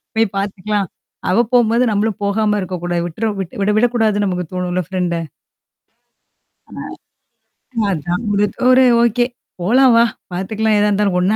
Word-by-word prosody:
போய் 225 0 +3
பார்த்துக்கலாம். 200 0 -2 0.4
அவ 220 +6 +3
போம்போது, 235 0 +4
நம்மளும் 210 0 -1
போகாம 210 +1 +1
இருக்கக்கூடாது. 175 -2 -3
விட்ற 215 +7 -2
விட் 185 -3 -5
விட 205 +1 +2
விடக்கூடாதுன்னு 220 -3 +2
நமக்கு 180 -1 -2
தோணும்ல 180 0 -2
ஃப்ரெண்ட. 175 -3 -2 1.5
ஆ. - - -7 1.1
அதான் 175 +4 -2
முடித் 205 0 0
ஒரு 255 0 +6 0.2
ஓகே 235 +1 +2 0.4
போலாம் 250 +7 +4
வா. 235 - +6 0.3
பாத்துக்கலாம் 215 +3 0
எதா 210 0 +3
இருந்தாலும். 200 -2 +1
ஒண்ணா 195 +4 +2
205 Hz, 130 wpm, -18 LUFS, 180-220 Hz, 1.5 s, ஒரு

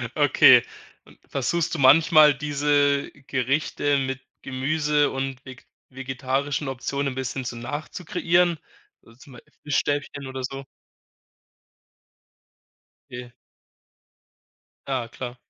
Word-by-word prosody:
Okay. - - +6 0.7
Versuchst 160 +5 -1
du 155 - -5
manchmal, 155 +2 +6
diese 145 0 0 0.2
Gerichte 140 +2 0
mit 135 -1 -3 0.2
Gemüse 145 +3 0
und 135 0 -4
vege 130 -1 -12 0.3
vegetarischen 135 +2 -3
Optionen 140 +1 -3
'n - - -13
bisschen 130 0 -4
so 120 - -5
nachzukreieren? 165 +6 -1 0.5
Also, 115 +1 -20
zum 140 -1 -15
Beispiel 125 - -17
Fischstäbchen 145 -1 -2
oder 130 0 -6
so? 135 +2 -5 2.5
Okay. 125 0 -9 1.5
Ja, 130 -4 -2
klar. 125 +1 -8
135 Hz, 95 wpm, -24 LUFS, 130-145 Hz, 2.5 s, Okay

